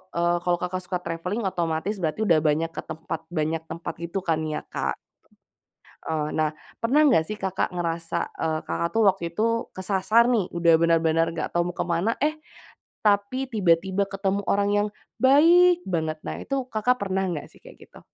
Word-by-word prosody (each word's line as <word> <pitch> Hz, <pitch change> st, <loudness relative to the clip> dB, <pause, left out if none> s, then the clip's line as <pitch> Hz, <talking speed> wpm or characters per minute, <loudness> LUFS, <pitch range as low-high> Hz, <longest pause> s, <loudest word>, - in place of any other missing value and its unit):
eee, 170 Hz, 0 st, +2 dB
kalau 175 Hz, -1 st, +2 dB
Kakak, 185 Hz, +1 st, -2 dB
suka 180 Hz, 0 st, -2 dB
travelling, 180 Hz, +7 st, -3 dB
otomatis 170 Hz, +3 st, -2 dB
berarti 160 Hz, +3 st, -1 dB
udah 165 Hz, -4 st, +5 dB
banyak 160 Hz, +2 st, +1 dB
ke -, -, -3 dB
tempat 160 Hz, 0 st, -5 dB, 0.2 s
banyak 155 Hz, +1 st, 0 dB
tempat, 170 Hz, -, -5 dB
gitu 170 Hz, +3 st, -4 dB
kan 160 Hz, -1 st, +2 dB
ya 150 Hz, -, -2 dB
Kak. -, -, -2 dB, 1.1 s
Eee, 155 Hz, -2 st, -1 dB
nah, 155 Hz, -1 st, +2 dB, 0.3 s
pernah 255 Hz, +6 st, +3 dB
enggak 230 Hz, -, +4 dB
sih 215 Hz, -, -4 dB
Kakak, 190 Hz, -2 st, -1 dB
ngerasa 170 Hz, -1 st, -2 dB
eee, 155 Hz, -1 st, -1 dB
Kakak, 170 Hz, -, -1 dB
tuh, 225 Hz, -, +2 dB
waktu 190 Hz, -2 st, 0 dB
itu 215 Hz, +6 st, 0 dB, 0.3 s
kesasar 195 Hz, +5 st, +2 dB
nih, 230 Hz, -6 st, +2 dB
udah 170 Hz, -1 st, +3 dB
benar-benar 165 Hz, 0 st, +3 dB
enggak -, -, -3 dB
tahu 175 Hz, +1 st, +1 dB
mau -, -, -28 dB
ke -, -, -1 dB
mana, 175 Hz, +6 st, +1 dB
eh, 305 Hz, +2 st, +1 dB, 0.6 s
tapi 210 Hz, +6 st, +1 dB
tiba-tiba 190 Hz, -3 st, +2 dB
ketemu 195 Hz, 0 st, -2 dB
orang 200 Hz, +1 st, +1 dB
yang, 205 Hz, +1 st, +2 dB, 0.3 s
baik 340 Hz, +7 st, +6 dB
banget! 160 Hz, -3 st, -1 dB
Nah -, -, -3 dB
itu, 270 Hz, -2 st, -2 dB
Kakak, 250 Hz, +3 st, +1 dB
pernah 190 Hz, -1 st, -1 dB
enggak 175 Hz, -5 st, -4 dB
sihh, -, -, -19 dB
kayak -, -, -14 dB
gitu? -, -, -15 dB
180 Hz, 180 wpm, -25 LUFS, 165-210 Hz, 1.1 s, baik